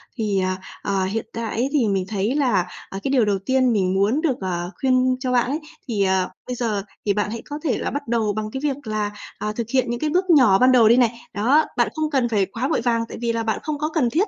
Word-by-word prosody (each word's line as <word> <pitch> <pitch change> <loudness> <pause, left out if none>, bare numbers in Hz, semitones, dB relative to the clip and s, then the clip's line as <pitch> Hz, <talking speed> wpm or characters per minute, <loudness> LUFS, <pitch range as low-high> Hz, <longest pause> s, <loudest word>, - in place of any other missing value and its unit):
Thì, 210 -5 0
ờ, 185 0 0 0.3
ờ, 195 -1 0
hiện 215 +3 -2
tại 230 -1 -4
ấy, 250 +4 0
thì 265 -8 +2
mình 190 -2 0
thấy 210 +4 -1
là, 245 -11 +2 0.2
à, 195 - -5
cái 270 - -1
điều 250 -5 +4
đầu 200 -2 +1
tiên 255 +4 +2
mình 190 -3 +1
muốn 205 +10 +2
được, 290 -7 +1
ờ, 175 -1 -3
khuyên 255 -1 +3
cho 255 -1 -2
bạn 245 -1 +3
ấy, 295 - -1 0.3
thì, 210 -4 0
ờ, 190 -1 +1 0.2
bây 250 - -3
giờ 220 -5 -1 0.2
thì 200 - +2
bạn 210 0 -1
hãy 230 - -5
có 295 - -4
thể 295 - +1
là - - -3
bắt 285 -1 -4
đầu 225 -3 +1
bằng 215 +1 -4
cái 265 - -4
việc 285 -4 -2
là, 210 -1 -1 0.3
à, 210 - -3
thực 230 -2 -4
hiện 255 -1 +1
những 240 0 -2
cái 310 - 0
bước 365 +4 0
nhỏ 255 - +6
ban 255 +1 +5
đầu 235 -4 +6
đi 235 - +6
này. 235 -2 +2
Đó, 260 +10 +3
bạn - - +3
không 310 -1 -1
cần 260 -5 +1
phải 205 -4 +2
quá 230 +7 -3
vội - - 0
vàng, 230 -1 +1
tại - - -7
vì 235 -1 0
là 230 0 -1
bạn 220 -1 -1
không 305 -1 -2
có 305 +1 -1
cần 305 -7 +1
thiết 355 - +1
235 Hz, 280 wpm, -22 LUFS, 205-265 Hz, 0.3 s, nhỏ